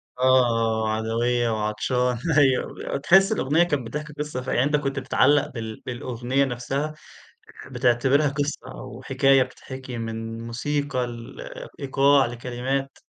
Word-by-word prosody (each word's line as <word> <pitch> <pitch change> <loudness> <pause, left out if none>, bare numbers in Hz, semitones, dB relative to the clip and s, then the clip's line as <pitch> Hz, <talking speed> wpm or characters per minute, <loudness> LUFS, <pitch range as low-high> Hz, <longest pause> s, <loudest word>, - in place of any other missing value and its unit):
آه، 125 - -7
آه، 115 -4 +3
آه - - 0
عدوية 115 +2 0
وعطشان 115 +3 0 0.2
أيوه. 135 -3 +4
ب - - -6
وتحِس 190 +8 +4
الأغنية 160 -4 +2
كانت 145 -8 0
بتحكي 150 +6 -5
قصة 150 -3 -4
ف 125 - -10
يعني 120 - +2
أنت 150 +1 +2
كنت 135 -2 -2
بتتعلّق 145 +2 +3
بال 110 -2 -6
بالأغنية 125 +1 -1
نَفْسها 135 +4 -3 0.7
آآ - - -13
بتعتبرها 130 +3 +2
قصة 145 +1 -3
أو - - -9
حكاية 135 -1 +4
بتتحكي 130 0 -9
من 115 0 -5
موسيقى، 135 +1 -2 0.7
لإيقاع، 140 0 +4
لكلمات. 125 +3 -3
130 Hz, 135 wpm, -24 LUFS, 120-140 Hz, 0.7 s, أيوه